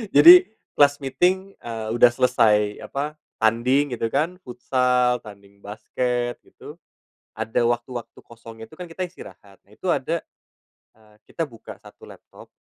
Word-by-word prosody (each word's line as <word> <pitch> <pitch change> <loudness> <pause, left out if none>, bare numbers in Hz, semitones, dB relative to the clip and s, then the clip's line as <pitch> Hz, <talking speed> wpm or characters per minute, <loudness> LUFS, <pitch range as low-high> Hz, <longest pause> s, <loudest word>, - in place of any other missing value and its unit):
Jadi, 345 - +11 0.4
class 145 -1 +5
meeting, 185 +8 0
eee, 115 -2 -6
udah 120 0 +6
selesai 105 -5 +2
apa, 150 +2 -5 0.3
tanding 125 +5 +2
gitu 115 - -1
kan, 170 +4 -1
futsal, 125 0 0
tanding 100 -1 -15
basket 120 +3 -3
gitu. - - -14 0.6
Ada 110 +2 -1
waktu-waktu 120 0 -4
kosong 115 -1 -13
itu 115 - -16
kan, 180 - -7
kita 185 +3 -6
istirahat. 100 - -15
Nah, - - -24
itu - - -10
ada, - - -2 0.7
eee, 105 -1 -24
kita 165 - -3
buka 115 -2 -12
1 - - -16
laptop. - - -16
120 Hz, 140 wpm, -22 LUFS, 110-135 Hz, 0.7 s, Jadi